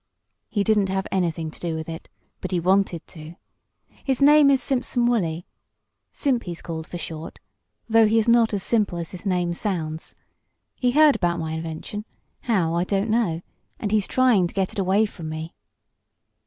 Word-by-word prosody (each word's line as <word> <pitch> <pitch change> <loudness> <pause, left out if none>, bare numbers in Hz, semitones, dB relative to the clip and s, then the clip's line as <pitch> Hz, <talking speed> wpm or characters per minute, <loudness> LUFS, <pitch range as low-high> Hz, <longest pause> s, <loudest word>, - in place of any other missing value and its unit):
"He 205 -3 0
didn't 205 -2 +2
have 190 0 -1
anything 165 -4 -1
to - - -15
do 170 -2 -3
with 160 0 -5
it 165 0 -8 0.3
but 185 - -5
he 180 - 0
wanted 185 -1 +1
to. 160 0 -11 0.7
His 265 -2 0
name 290 0 +7
is 275 -1 +4
Simpson 250 -2 0
Wolley 175 -9 0 0.7
Simp, 260 -5 0
he's 175 -2 -6
called 160 -1 -5
for 175 - -6
short, 160 -1 -7 0.5
though 225 -1 +5
he 220 +2 +2
is 225 - +2
not 235 -1 +4
as 200 -3 -2
simple 210 -6 +1
as 170 -1 -5
his 185 +2 -7
name 180 -2 0
sounds. 165 -5 -4 0.6
He 250 - +1
heard 300 +2 +5
about 175 -1 0
my 160 -1 -3
invention 160 +6 -5 0.3
how, 185 -9 0
I 170 +1 +1
don't 200 +3 -1
know 185 -8 0 0.4
and 205 - -3
he's 210 -2 +2
trying 245 -9 +3
to - - -14
get 190 -1 0
it 215 - -4
away 195 +3 +3
from 170 -6 -7
me." 160 +1 -6
190 Hz, 180 wpm, -24 LUFS, 165-225 Hz, 0.7 s, name